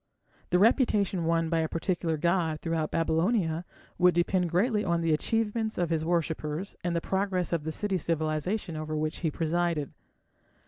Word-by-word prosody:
The 180 - +3
reputation 200 - +3
won 165 0 +2
by 165 0 +1
a 160 -1 0
particular 165 -1 -1
god 170 -1 +1
throughout 165 -2 -1
Babylonia 165 +1 +1 0.3
would 180 -1 +5
depend 175 0 +1
greatly 210 +5 +2
on 170 -3 +1
the 165 -1 +2
achievements 220 +5 0
of 175 -2 0
his 160 -1 +1
worshippers 165 +1 -2
and 175 -1 -1
the 170 - 0
progress 190 -2 -1
of 160 -3 -1
the 160 - -2
city 195 +2 -1
civilization 160 +4 -1
over 155 0 -4
which 155 +1 -2
he 165 - 0
presided. 165 -1 -1
170 Hz, 165 wpm, -28 LUFS, 160-185 Hz, 0.3 s, would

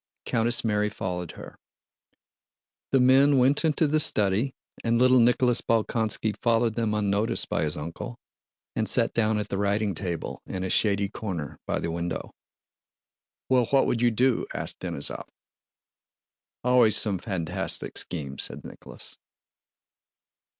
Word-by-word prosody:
Countess 115 +1 +2
Mary 105 -1 +1
followed 90 -4 -5
her. - - -12 1.3
The 135 - +4
men 135 +3 +5
went 130 +5 +3
into 160 0 +2
the 155 +1 +2
study 110 -2 +1 0.3
and 115 0 +2
little 130 +1 +5
Nicholas 125 0 +3
Bolkónski 110 -2 0
followed 115 -1 +2
them 110 -2 -1
unnoticed 105 +1 0
by - - 0
his 75 -1 -2
uncle 80 +10 -6 0.6
and - - 0
sat - - +2
down 110 -1 +1
at 105 -1 -3
the 100 - -2
writing 100 0 0
table 90 -4 -5
in 95 -1 -4
a 95 - -2
shady 100 -2 +2
corner 90 -8 -6
by - - 0
the 85 - -3
window. 85 0 -4 1.2
"Well, 125 -2 +3
what 135 -1 +3
would 120 - 0
you 120 - +4
do?" 120 +2 +1
asked - - -4
Denísov. - - -3 1.4
"Always 125 -3 +5
some 100 -4 +1
fantastic 90 -6 -3
schemes," 70 -6 -3
said - - -4
Nicholas. - - -10
110 Hz, 135 wpm, -26 LUFS, 100-125 Hz, 1.4 s, men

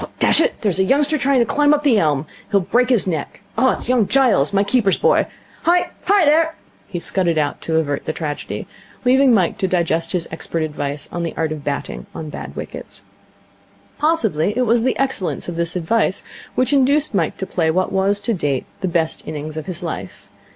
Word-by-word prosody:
Dash - - +4
it, - - 0
there's 195 -4 0
a - - +5
youngster 285 +7 +2
trying 275 -3 +2
to - - +3
climb 295 +4 +3
up 295 - -3
the 250 -7 +4
elm. 150 -4 +1 0.2
He'll 200 - +3
break 240 +7 +1
his 245 -6 +4
neck. 165 -6 -4
It's 255 +1 +1
young 240 -5 +3
Giles, 240 - +3
my 200 0 +2
keeper's 200 -2 +2
boy. - - +3 0.3
Hi! 350 +1 +2
Hi, 400 -3 +4
there!' 320 +2 +3 0.3
He 175 - -4
scudded 170 -2 0
out 150 -1 -1
to 160 - -2
avert 145 -3 0
the - - -1
tragedy, 150 -2 -5 0.4
leaving 265 +1 +5
Mike 190 -6 +2
to 190 - +1
digest 170 -2 0
his 175 -2 -1
expert 160 0 -3
advice 145 -1 -4
on 175 - -3
the 170 - -3
art 160 -1 0
of 155 -2 -5
batting 140 -1 -4
on 155 -2 -6
bad - - -8
wickets. - - -8 1.0
Possibly 225 - +1
it 255 - +3
was 235 +1 +3
the 255 +2 0
excellence 265 -9 -1
of 175 - -4
this 170 +1 -1
advice 190 +3 +1 0.3
which 255 +3 +1
induced 280 +2 +3
Mike 170 -6 0
to 190 - -3
play 165 -4 0
what 185 +3 0
was, 195 +1 +1
to 230 - -1
date, 145 -8 -1
the 190 - -2
best 165 -2 0
innings 155 0 -5
of 155 +2 -6
his 180 -1 -5
life. 100 - -6
190 Hz, 200 wpm, -20 LUFS, 160-255 Hz, 1.0 s, a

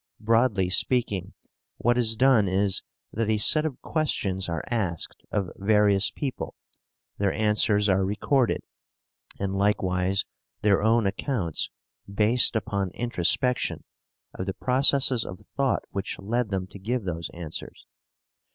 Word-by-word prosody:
Broadly 110 -4 +2
speaking, 100 -3 0 0.4
what 120 +1 +2
is 115 -2 +2
done 125 -4 +4
is, 95 +1 +1 0.3
that 110 0 -1
a 110 - +3
set 155 +8 +4
of 135 - -7
questions 95 - 0
are 80 -3 -2
asked 100 -9 -2
of 100 -4 -1
various 105 -1 +3
people, 135 -4 -5 0.6
their 100 -1 +2
answers 105 -1 +2
are 95 -1 +3
recorded, 115 +6 +1 0.8
and 95 0 -2
likewise 95 -1 +1 0.4
their 100 -2 +4
own 110 +1 +3
accounts, 100 - -1 0.4
based 110 +5 +3
upon 100 -3 -1
introspection, 120 +2 0 0.5
of 95 - -5
the 95 - -2
processes 130 -1 +2
of 90 - -9
thought 135 -2 +1
which 100 +1 -4
led 115 +3 -1
them 95 -2 -2
to 95 +2 -12
give 115 +4 -2
those 85 -3 -4
answers. 85 -2 -8
105 Hz, 130 wpm, -26 LUFS, 95-120 Hz, 0.8 s, done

